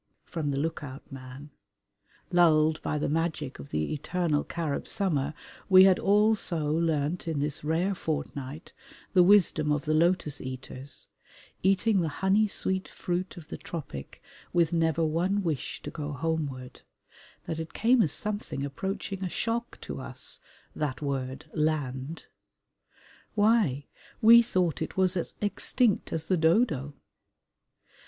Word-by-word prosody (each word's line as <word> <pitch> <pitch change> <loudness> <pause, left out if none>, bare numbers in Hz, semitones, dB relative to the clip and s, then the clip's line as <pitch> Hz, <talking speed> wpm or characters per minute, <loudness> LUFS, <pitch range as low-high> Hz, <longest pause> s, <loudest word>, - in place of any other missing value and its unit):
from 160 -4 -3
the 140 - -1
look 155 +1 -2
out 135 -1 -8
man; 135 +2 -10 0.8
lulled 160 -3 +4
by 150 - -1
the 150 - -1
magic 155 - -2
of 70 - -9
the 75 - -1
eternal 155 0 0
Carib 160 -4 -3
summer, 150 -7 0 0.3
we 185 -1 +9
had 190 -1 +5
all 210 +2 +4
so 165 -8 -1
learnt 160 +1 0
in 160 -3 -1
this 145 0 -1
rare 165 +6 +1
fortnight 150 -3 -5 0.4
the 185 - +6
wisdom 175 -5 +4
of 150 -1 0
the 155 - +1
lotus 160 -3 +2
eaters, 130 +1 -8 0.5
eating 195 +1 +3
the 165 - 0 0.2
honey 205 +3 +4
sweet 190 -1 -1
fruit 180 +1 -3
of 160 -3 -11
the - - -5
tropic 135 - -7 0.3
with 170 -1 +2
never 165 -1 +2
one 180 +6 0
wish 160 -6 -3
to - - -5
go 150 -2 -5
homeward, 140 -4 -3 0.6
that 160 - -4
it 160 - -7
came 240 +2 +4
as 160 - +2
something 205 -9 -2
approaching 190 +6 -4
a 185 - -2
shock 235 +5 -2
to - - -6
us, - - -3 0.4
that 145 -2 -3
word 135 -1 -3
"land." 150 -1 -2 1.1
Why, 205 - +3 0.3
we 230 +2 +9
thought 185 -8 0
it - - -4
was 185 -1 +3
as 175 - -2
extinct 210 +2 +1
as 160 -1 -2
the 185 - +1
dodo! 160 - +2
160 Hz, 145 wpm, -28 LUFS, 145-185 Hz, 1.1 s, we